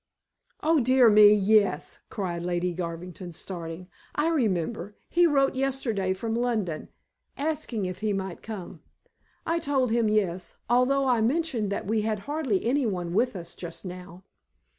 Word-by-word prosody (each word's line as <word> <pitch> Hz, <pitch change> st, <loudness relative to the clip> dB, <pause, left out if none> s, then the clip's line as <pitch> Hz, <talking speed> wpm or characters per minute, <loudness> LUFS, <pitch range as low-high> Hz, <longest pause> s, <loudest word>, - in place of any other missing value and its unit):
"Oh, 320 Hz, 0 st, +4 dB
dear 255 Hz, -2 st, +5 dB
me, 210 Hz, 0 st, +8 dB
yes," 205 Hz, -1 st, +2 dB
cried 175 Hz, -4 st, -3 dB
Lady 175 Hz, 0 st, -1 dB
Garvington, 175 Hz, +1 st, -6 dB
starting. 170 Hz, 0 st, -7 dB, 0.3 s
"I 300 Hz, +2 st, +2 dB
remember. 210 Hz, -, -1 dB
He 345 Hz, 0 st, +4 dB
wrote 275 Hz, -3 st, +3 dB
yesterday 255 Hz, -8 st, -1 dB
from 225 Hz, +3 st, -3 dB
London, 225 Hz, -9 st, -1 dB, 0.5 s
asking 285 Hz, -8 st, -2 dB
if 185 Hz, 0 st, -5 dB
he 215 Hz, -1 st, 0 dB
might 190 Hz, -2 st, -4 dB
come. 190 Hz, -6 st, -8 dB, 0.6 s
I 335 Hz, +1 st, +1 dB
told 270 Hz, -6 st, +1 dB
him 230 Hz, -2 st, +2 dB
yes, 190 Hz, -4 st, -1 dB
although 250 Hz, +3 st, +3 dB
I 245 Hz, -3 st, +3 dB
mentioned 245 Hz, -4 st, 0 dB
that 200 Hz, -, -2 dB
we 215 Hz, +2 st, +1 dB
had 215 Hz, 0 st, -1 dB
hardly 280 Hz, -8 st, -1 dB
anyone 215 Hz, -10 st, 0 dB
with 245 Hz, +4 st, +1 dB
us 170 Hz, -2 st, -7 dB
just 175 Hz, +2 st, -8 dB
now." 180 Hz, 0 st, -9 dB
215 Hz, 145 wpm, -27 LUFS, 180-255 Hz, 0.6 s, me